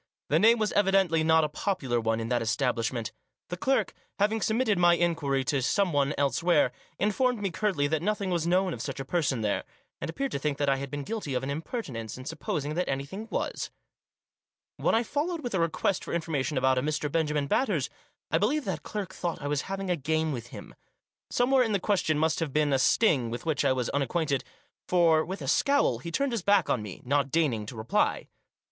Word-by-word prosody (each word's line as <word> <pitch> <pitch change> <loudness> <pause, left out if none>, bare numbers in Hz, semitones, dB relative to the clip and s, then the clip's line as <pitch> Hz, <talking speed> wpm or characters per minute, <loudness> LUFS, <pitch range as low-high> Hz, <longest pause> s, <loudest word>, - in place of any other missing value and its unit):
The - - +4
name 230 +2 +6
was 215 -2 0
evidently 195 -5 +3
not 160 0 +4
a - - +2
popular 150 - -1
one 115 0 0
in 115 0 -3
that 120 -1 +1
establishment. 115 -1 -1 0.4
The 180 - -3
clerk, 265 +9 +1 0.2
having 215 +2 +1
submitted 220 -3 +1
my 175 -1 +6
inquiry 160 -6 0
to 140 0 0
someone 150 -2 +1
elsewhere, 165 +5 +2 0.3
informed 225 +5 +1
me 200 -2 -2
curtly 185 -5 0
that 155 +1 0
nothing 200 0 -1
was 170 -2 0
known 185 +1 +2
of - - -6
such 135 -1 -5
a 135 - -4
person 140 -6 0
there, 105 -2 0 0.4
and - - -4
appeared 275 +9 -3
to - - -2
think 145 0 -1
that 145 -1 +1
I 135 - +2
had 140 0 -5
been 145 0 -4
guilty 205 -8 -4
of 125 - -1
an 135 - -2
impertinence 140 - -5
in 130 - -9
supposing 150 +1 -3
that 180 +3 -1
any 135 0 -1
thing 200 +9 -7
was. - - -3 1.1
When - - +2
I 230 - +3
followed 310 +7 -2
with 245 -6 -4
a 190 - +1
request 165 +3 0
for - - -6
information 155 -4 -1
about 130 0 +3
a - - -1
Mr. 150 +1 -2
Benjamin 150 -2 0
Batters, 170 - +1 0.4
I 160 - +3
believe 270 - +1
that - - -3
clerk 200 -3 -5
thought 175 -2 -3
I 145 - -7
was 145 +4 -2
having 195 -1 -2
a - - +3
game 160 +1 0
with 120 -4 -5
him. - - -10 0.6
Somewhere 255 +2 +3
in 225 -4 +1
the 200 - +2
question 180 -6 +1
must 160 +1 +1
have 160 -4 -2
been 150 0 +2
a 135 - +3
sting, 130 - +3
with 120 +6 -6
which 160 -4 0
I - - +3
was 130 -2 0
unacquainted; 140 0 0 0.4
for, 165 -3 +4
with 190 +4 -6
a - - -5
scowl, 280 - +2
he 170 - -6
turned 275 +9 0
his 230 -4 -1
back 200 -1 +3
on 120 - +1
me, 105 -3 -8
not 140 +1 +1
deigning 130 -10 0
to 120 - -7
reply. 110 +1 0
160 Hz, 215 wpm, -28 LUFS, 135-195 Hz, 1.1 s, name